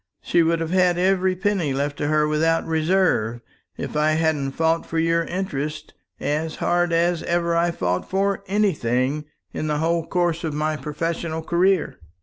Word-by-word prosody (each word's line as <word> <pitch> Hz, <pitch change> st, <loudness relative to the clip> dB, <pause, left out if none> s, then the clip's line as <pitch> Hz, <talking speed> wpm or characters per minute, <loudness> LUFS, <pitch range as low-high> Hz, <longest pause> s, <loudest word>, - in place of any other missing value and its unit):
She 170 Hz, -, +3 dB
would 165 Hz, 0 st, +2 dB
have 165 Hz, 0 st, -3 dB
had 180 Hz, -1 st, +3 dB
every 185 Hz, 0 st, +2 dB
penny 185 Hz, -6 st, 0 dB
left 145 Hz, +1 st, -1 dB
to 145 Hz, -, -1 dB
her 150 Hz, 0 st, +2 dB
without 160 Hz, +2 st, +1 dB
reserve, 160 Hz, -, +1 dB, 0.4 s
if -, -, -5 dB
I 155 Hz, +1 st, +3 dB
hadn't 155 Hz, -4 st, 0 dB
fought 165 Hz, +2 st, +1 dB
for 165 Hz, -, -5 dB
your 165 Hz, +1 st, +2 dB
interests 155 Hz, -5 st, -4 dB, 0.3 s
as 155 Hz, +2 st, -2 dB
hard 175 Hz, 0 st, +1 dB
as 170 Hz, 0 st, +2 dB
ever 170 Hz, 0 st, 0 dB
I 170 Hz, +1 st, +2 dB
fought 90 Hz, -, -2 dB
for 195 Hz, +1 st, 0 dB
anything 150 Hz, -, 0 dB, 0.3 s
in 155 Hz, -, -3 dB
the 150 Hz, -1 st, 0 dB
whole 165 Hz, +1 st, 0 dB
course 175 Hz, -2 st, 0 dB
of 155 Hz, -3 st, -2 dB
my 155 Hz, +1 st, 0 dB
professional 160 Hz, +2 st, -3 dB
career." 180 Hz, +1 st, +1 dB
165 Hz, 165 wpm, -23 LUFS, 150-175 Hz, 0.4 s, She